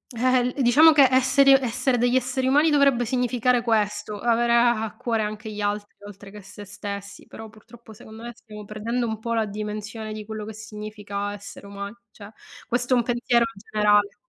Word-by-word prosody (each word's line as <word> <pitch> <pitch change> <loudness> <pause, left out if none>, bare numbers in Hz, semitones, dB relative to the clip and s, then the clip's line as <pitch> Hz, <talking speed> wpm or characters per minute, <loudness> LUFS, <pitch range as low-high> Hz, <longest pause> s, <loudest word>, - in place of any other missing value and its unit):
Eh-eh, 250 +1 +1
diciamo 290 +7 +6
che 285 -3 +6
esseri 260 +2 +4
essere 255 -1 +1
degli 245 +1 +2
esseri 260 +1 0
umani, 295 +4 +4
dovrebbe 280 -4 +3
significare 250 0 +1
questo, 210 -2 -1
avere 235 +1 +1
a 235 -1 +3
a 220 - -6
cuore 230 -2 -2
anche 215 +1 -6
gli 210 0 -6
altri 205 0 -3
oltre 200 0 -12
che 210 0 -11
se 205 +2 -11
stessi, 200 0 -8
però 225 - -10
purtroppo 220 +1 -16
secondo 220 +1 -13
me 240 - -6
stiamo 210 -2 -12
perdendo 230 +4 -3
un 220 -1 -3
po' 230 +1 -3
la 225 -1 +1
dimensione, 210 +1 -6
di 215 0 -7
quello 215 0 -6
che 220 - -8
significa 210 -1 -6
essere 200 0 -11
umani, 200 +1 -7 0.2
cioè 205 0 -13 0.4
questo 245 +1 0
è, - - +4
un 240 - +2
pensiero 240 0 +1
generale. 205 0 +1
220 Hz, 185 wpm, -24 LUFS, 210-245 Hz, 0.4 s, diciamo